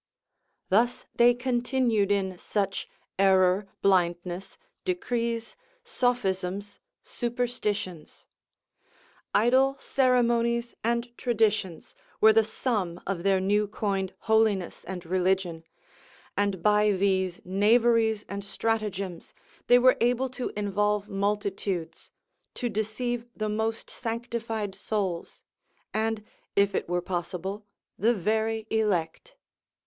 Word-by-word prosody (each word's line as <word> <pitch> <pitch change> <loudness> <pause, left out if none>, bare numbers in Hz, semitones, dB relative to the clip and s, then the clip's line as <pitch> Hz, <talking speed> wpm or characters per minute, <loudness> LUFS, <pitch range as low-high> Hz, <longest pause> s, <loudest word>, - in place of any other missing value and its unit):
Thus 235 +5 +2
they 240 0 +5
continued 245 -4 +1
in 190 -2 0
such 195 -2 -2 0.3
error, 190 0 +4 0.2
blindness, 180 -1 +1 0.3
decrees, 235 -10 -2 0.3
sophisms, 200 - -1 0.2
superstitions; 220 -8 -3 1.1
idle 260 +5 +4
ceremonies 235 -3 +2
and 235 +1 -1
traditions 215 -7 0 0.3
were 220 0 +7
the 225 0 +5
sum 210 -6 -2
of 190 -3 -2
their 195 0 +3
new 205 +2 +2
coined 195 -2 -2
holiness 220 -5 +1
and 180 -1 -6
religion, 180 -2 0 0.7
and 200 -4 0
by 210 0 +4
these 190 -2 +1
knaveries 220 +2 +3
and 200 0 -5
stratagems 200 -3 -3 0.3
they 245 - +7
were 255 +1 +5
able 245 +2 +2
to 255 0 -4
involve 210 0 0
multitudes, 200 -3 -2 0.5
to 245 - -2
deceive 230 +3 -2
the 215 -1 -2
most 220 +1 -2
sanctified 230 -3 -3
souls, 190 -5 -3 0.5
and, 220 0 -1 0.3
if 200 0 +3
it - - -2
were 175 0 0
possible, 185 +3 -4 0.3
the 235 +3 +3
very 220 +3 0
elect. 200 -7 -1
210 Hz, 100 wpm, -27 LUFS, 190-235 Hz, 1.1 s, were